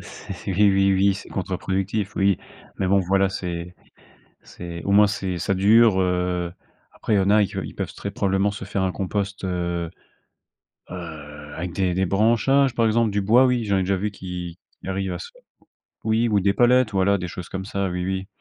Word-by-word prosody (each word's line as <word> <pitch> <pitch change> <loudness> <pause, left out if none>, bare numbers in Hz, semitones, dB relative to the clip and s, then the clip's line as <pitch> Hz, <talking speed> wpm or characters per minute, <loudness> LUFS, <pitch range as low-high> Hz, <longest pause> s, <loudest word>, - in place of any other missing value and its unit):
C 100 - -9
c'est 95 - -6
eh - - 0 0.2
oui, 95 0 +3
oui, 100 +1 +3
c'est 100 - -9
contre-productif, 95 +2 -2
oui 100 -1 +2 0.4
mais 95 - 0
bon, 100 +1 +4
voilà, 95 +1 +2
c'est 90 -2 -5 0.7
c'est 85 -1 -8
au - - -2
moins, 105 +1 +7
c'est 95 -3 -3
ça 100 +3 0
dure, 105 +1 +5
heu, 90 -1 0 0.4
après 110 - -2
il - - +4
y - - +4
en 95 - +1
a 105 0 +5
que - - -5
ils - - -8
peuvent - - -4
très 100 - -5
probablement 100 -2 +1
se 100 - -7
faire 100 0 -2
un 90 - 0
compost, 100 +1 -3
heu 85 -2 -2 1.0
heu, 75 -4 -9
avec 85 +1 -4
des 95 -1 0
des 95 +1 +1
branchages, 120 +7 +3
par 115 -1 +2
exemple. 110 0 +2
Du 100 - 0
bois, 115 +6 +5
oui, 125 -2 +1
j'en 100 -1 +1
ai - - +2
déjà 95 +1 0
vu 105 +3 -2
qui 90 -2 -7 0.2
qui - - -9
arrivent 95 -1 -2
à 90 - -4
se 90 - -9 0.7
oui 110 +2 +2
ou 105 -2 +2
des 100 +1 +2
palettes. 120 0 +4
Voilà, 100 +1 +2
des 90 -1 -5
choses 90 +1 -8
comme 95 0 -5
ça. 100 -1 -2
Oui, 90 0 -3
oui 95 +1 -3
95 Hz, 210 wpm, -23 LUFS, 90-105 Hz, 1.0 s, moins